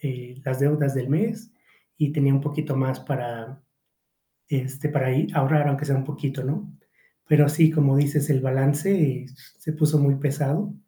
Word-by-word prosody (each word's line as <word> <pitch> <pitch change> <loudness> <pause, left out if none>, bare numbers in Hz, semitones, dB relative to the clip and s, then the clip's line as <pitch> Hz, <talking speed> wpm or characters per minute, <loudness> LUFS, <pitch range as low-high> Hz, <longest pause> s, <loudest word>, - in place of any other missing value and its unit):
eh, 125 -2 -7
las 130 0 -2
deudas 145 -1 +2
del 130 -1 -3
mes 220 +7 -1 0.5
y 150 -2 0
tenía 140 -2 +2
un 135 - +3
poquito 150 0 -3
más 130 0 -1
para, 120 0 -6 0.9
este, 135 +1 -3
para 140 -3 0
ahí 135 +5 +1
ahorrar 145 0 +2
aunque 140 +1 -1
sea 140 -2 +1
un 135 - -1
poquito, 140 -2 -5
¿no? 180 +8 -4 0.6
Pero 150 -1 +6
así, 155 +2 +4
como 140 -3 +3
dices, 145 +1 +1
el 135 -2 +3
balance 135 +1 +1 0.3
se 155 - -4
puso 155 -1 +2
muy 140 -1 +4
pesado 145 +7 -1
140 Hz, 165 wpm, -24 LUFS, 135-150 Hz, 0.9 s, Pero